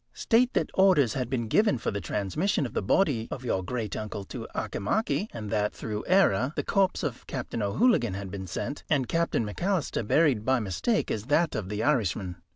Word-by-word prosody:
State 245 +2 +3
that - - 0
orders 180 - +4
had 125 -3 -2
been 120 -3 -1
given 210 - +3
for - - -2
the 100 -1 -3
transmission 105 - -1
of 120 - -6
the - - 0
body 115 - +1
of 130 - -6
your 95 -6 0
great 110 0 -3
uncle 105 -1 -5
to - - -7
Auchimachie, 210 - -1
and 105 -3 -6
that, 105 -1 0
through 105 -1 -4
error, 145 - +3
the - - -1
corpse 195 -2 +1
of 135 -6 -4
Captain 125 -3 -4
O'Hooligan 115 - +2
had 100 -1 -6
been 95 -1 -6
sent, 140 - -4
and 140 -5 +2
Captain 165 -7 0
McAlister 175 - -1
buried 140 -8 +3
by 130 +2 +2
mistake 115 - -1
as 105 0 -3
that 155 +5 +2
of 100 -4 -3
the 105 +1 -2
Irishman. 100 - 0
120 Hz, 195 wpm, -27 LUFS, 105-165 Hz, -, orders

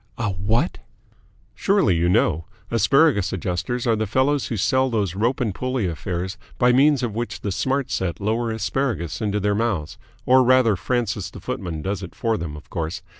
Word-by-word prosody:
"A 115 -4 -1
what?" 105 - 0 0.7
"Surely 195 - +2
you 85 +1 +2
know? 90 -5 +2 0.3
Asparagus 115 - +3
Adjusters 95 +7 -2
are 115 -2 +3
the 110 0 -1
fellows 130 +6 +1
who 115 - -3
sell 130 +6 +2
those 105 -7 0
rope 115 +8 0
and 115 -6 0
pulley 130 +1 -2
affairs 90 +2 -3 0.2
by 125 0 +4
means 140 +1 +4
of 115 -4 -1
which 120 +2 -4
the 100 - -2
Smart 135 +6 -1
Set 90 -3 -2
lower 110 +3 0
asparagus 110 - -2
into 105 -1 0
their 105 +1 +1
mouths 100 -8 -2 0.3
or 130 +1 +6
rather 125 -4 +4
Francis 110 -2 -2
the - - -11
footman 90 - -4
does 100 +2 -2
it 90 - -9
for 115 -1 0
them, 80 -5 -5
of 75 - -13
course. 85 +2 -3
110 Hz, 180 wpm, -23 LUFS, 95-125 Hz, 0.7 s, or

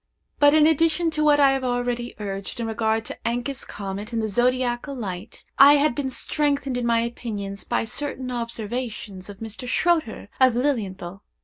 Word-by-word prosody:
But, 290 +1 +6
in 305 -1 +6
addition 325 +2 +3
to 305 -1 0
what 295 -1 +5
I 275 -1 +6
have 270 -1 -1
already 245 -1 -2
urged 195 0 -5
in 230 - -2
regard 225 0 0
to - - -6
Encke's 245 +4 -2
comet 200 +2 -6
and 230 - -1
the 220 - 0
zodiacal 245 +4 0
light, 200 -3 -6
I 280 +1 +10
had 290 -1 +3
been 270 +1 -2
strengthened 280 0 -1
in 245 -1 -1
my 230 -1 +3
opinion 220 -4 -4
by 240 - +1
certain 255 +1 -4
observations 230 -4 -5
of 200 - -9
Mr. 225 +3 -6
Schroeter, 320 - 0
of 260 -2 +5
Lilienthal. 195 -9 -2
240 Hz, 175 wpm, -24 LUFS, 220-275 Hz, -, I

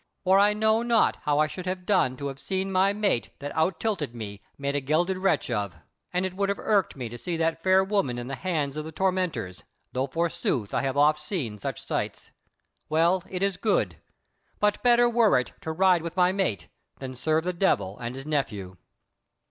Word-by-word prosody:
For 190 +1 +5
I 205 +1 +5
know 220 +1 +2
not 235 -1 +3
how 145 -1 +2
I 155 - +4
should 180 +4 -6
have 185 0 -3
done 185 -11 +2
to 140 - -4
have 135 0 -8
seen 190 0 -2
my 190 +1 +3
mate 200 - 0
that 145 0 -6
out 160 +2 +1
tilted 165 - -2
me 100 -3 -7 0.2
made 140 0 -2
a 145 - +1
gelded 175 +7 +1
wretch 195 -8 +1
of; 100 -6 -2 0.4
and 180 +1 0
it 185 - -3
would 200 0 0
have 200 - 0
irked 200 -5 +1
me 125 -3 -5
to 120 +2 -9
see 175 -2 -3
that 165 0 0
fair 190 +2 +4
woman 190 -11 0
in 120 - -4
the 135 - -6
hands 145 0 -2
of 155 - -3
the 160 - -7
tormentors, 180 - -1 0.3
though 130 +2 -1
forsooth 140 -8 -1
I - - +1
have 135 0 -2
oft 150 +1 +4
seen 150 - -4
such - - -5
sights. - - -3 0.6
Well, 170 +4 +3
it 185 0 -3
is 195 -2 +1
good; 215 -3 +1 0.6
but 210 0 +1
better 240 -1 +5
were 230 - +4
it 125 - -2
to 160 - -4
ride 180 +1 +4
with 170 +2 -6
my 180 0 +4
mate 110 - -1 0.3
than 130 -1 -7
serve 155 +5 +1
the 180 +1 -1
Devil 170 - 0
and 120 +1 -5
his 135 +1 -7
Nephew." 105 -12 -2
165 Hz, 210 wpm, -26 LUFS, 135-190 Hz, 0.6 s, For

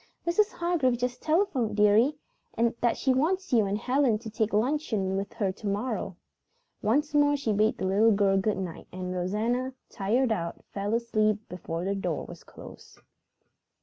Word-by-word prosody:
"Mrs. 410 +6 +2
Hargrave 330 -8 +1
just 245 0 -3
telephoned, 275 - +1
dearie, 210 +8 +4 0.6
that 240 -1 +1
she 265 - +2
wants 350 +5 0
you 220 -4 +4
and 200 +1 -1
Helen 250 0 +2
to 220 0 -9
take 220 0 0
luncheon 220 -5 0
with 195 +1 -3
her 195 -3 -1
to 205 +2 -8
morrow." 205 -2 -2 0.7
Once 290 +8 +1
more 290 0 +4
she 235 -6 -1
bade 215 +2 +2
the - - -3
little 205 +4 +4
girl 200 -1 +3
good 195 +2 +1
night, 185 -4 -6
and 185 0 -5
Rosanna, 225 +8 -1 0.2
tired 230 +5 +1
out, 170 -5 -3
fell 205 +2 -1
asleep 215 -2 0
before 175 -1 -5
the 195 - 0
door 180 -6 -3
was - - -11
closed. - - -13
220 Hz, 165 wpm, -28 LUFS, 200-260 Hz, 0.7 s, dearie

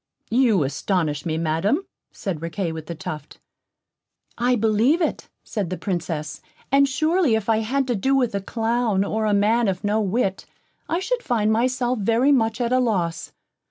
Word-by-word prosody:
"You 230 - +3
astonish 155 +1 -1
me, 160 -1 -1
Madam," 165 - 0 0.3
said 180 -7 -5
Riquet 165 +1 -3
with 160 -1 -7
the 170 - -5
Tuft. 150 -1 -7 1.0
"I 245 +1 +2
believe 225 +8 +3
it," 330 - -2
said 205 -6 -3
the 185 - -3
Princess, 165 -5 -3 0.3
"and 275 0 +4
surely 310 -1 +2
if 220 -2 -2
I 225 -1 +3
had 265 +5 0
to 245 -2 -1
do 265 +7 +1
with 250 -5 +1
a 200 - -1
clown, 225 -1 0
or 215 +2 -1
a 210 - +2
man 220 +3 +3
of 185 -2 -2
no 210 +2 +1
wit, 195 -1 -1 0.4
I 340 +3 0
should 485 +5 -1
find 220 - +1
myself 250 +1 +1
very 230 +7 +3
much 225 -4 +2
at 240 0 0
a 255 - +4
loss. 185 -9 -1
220 Hz, 175 wpm, -23 LUFS, 190-250 Hz, 1.0 s, and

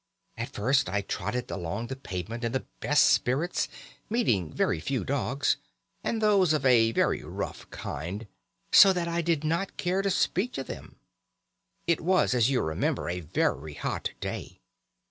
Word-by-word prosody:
"At - - -4
first 130 +1 +1
I 100 +2 0
trotted 105 +5 -3
along 100 +5 -3
the 135 - -5
pavement 115 -1 -5
in 115 0 -1
the 130 - -1
best 150 0 +4
spirits, 145 +8 +1 0.4
meeting 115 - +1
very - - 0
few 135 +7 -2
dogs, 135 +1 0 0.5
and 225 - -1
those 200 -6 +4
of 150 - 0
a 115 -3 +5
very - - +1
rough - - -6
kind, 95 +10 -5 0.5
so 195 -1 +9
that 175 -2 -1
I 170 0 0
did 165 -3 0
not 165 +5 -1
care 185 +2 0
to 195 - 0
speak 195 +5 +1
to 135 - -3
them. - - -9 0.9
It 170 -1 +1
was, 180 -4 +3
as 120 -1 +3
you 135 - +2
remember, 80 +2 -1
a 90 +1 -2
very 75 -2 -1
hot - - -2
day. - - -6
130 Hz, 165 wpm, -28 LUFS, 105-170 Hz, 0.9 s, so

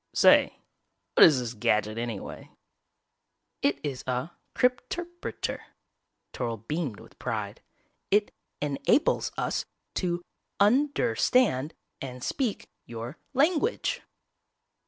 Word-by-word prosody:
"Say, - - +6 0.6
what - - +8
is 145 -5 +8
this 120 -2 -3
gadget 110 0 +1
anyway?" 115 -4 -5 1.1
"It 140 0 +2
is 135 -4 -3
a 125 +6 -1 0.2
cryp 250 0 +3
terp 350 0 -6
reter," - - -3 0.7
Toryl 115 -2 -4
beamed 150 -8 -2
with - - -16
pride. - - -3 0.5
"It 205 +1 +2 0.3
en 145 -2 -1
ables 295 - +3
us - - -1 0.3
to 175 -1 -1 0.4
un 250 +9 +5
der 235 - +1
stand 165 - +2 0.3
and 125 -2 -6
speak 245 -7 -1 0.2
your 120 +5 -7 0.2
lan 305 +5 +4
guage." 450 +8 -1
150 Hz, 115 wpm, -28 LUFS, -, 1.1 s, what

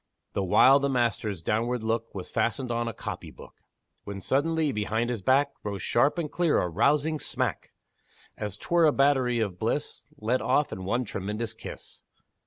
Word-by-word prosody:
The 100 - 0
while 130 +9 +6
the 140 0 0
master's 110 -7 -1
downward 115 +5 0
look 115 0 -2
Was 95 - -6
fastened 120 +3 -1
on 120 0 -1
a - - -1
copy - - -6
book; - - -14 0.5
When 100 -1 -6
suddenly, 150 - +1
behind 110 +2 -1
his 115 -4 -3
back, 140 +6 +3
Rose 100 -4 -4
sharp 135 +8 +2
and 160 -4 -2
clear 175 -3 +2
a - - 0
rousing 145 - +2
smack! - - -2 0.6
As 105 -1 -5
'twere 170 +8 +2
a 155 - +6
battery 135 -4 +2
of 100 -5 -2
bliss - - -3
Let 115 +4 0
off 145 - +2
in 95 - -6
one 120 +6 0
tremendous 105 +3 -4
kiss! 115 - -10
120 Hz, 175 wpm, -27 LUFS, 105-140 Hz, 0.6 s, while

